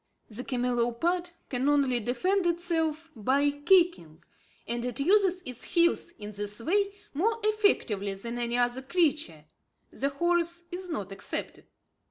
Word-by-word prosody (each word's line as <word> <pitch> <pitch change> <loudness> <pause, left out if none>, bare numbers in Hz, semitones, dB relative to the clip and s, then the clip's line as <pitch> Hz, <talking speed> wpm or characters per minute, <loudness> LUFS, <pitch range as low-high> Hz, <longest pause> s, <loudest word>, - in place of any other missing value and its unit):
The 230 +4 -5
camelopard 250 +9 0 0.2
can 260 +2 0
only 275 -4 +3
defend 360 - 0
itself 330 -2 -1
by 275 +6 +2
kicking; 290 - +2 0.4
and 235 +1 -2
it 245 0 -3
uses 370 +3 +3
its 250 -1 -4
heels 340 0 +3
in 210 0 -7
this 205 +1 -5
way 395 - +1 0.2
more 435 +10 +1
effectively 265 - +1
than 235 +5 -6
any 240 0 -1
other 245 +1 +1
creature, 275 - 0 0.5
the 275 - -1
horse 345 +3 +1 0.3
not 205 - -4
excepted. 195 -1 -5
280 Hz, 130 wpm, -28 LUFS, 235-345 Hz, 0.5 s, only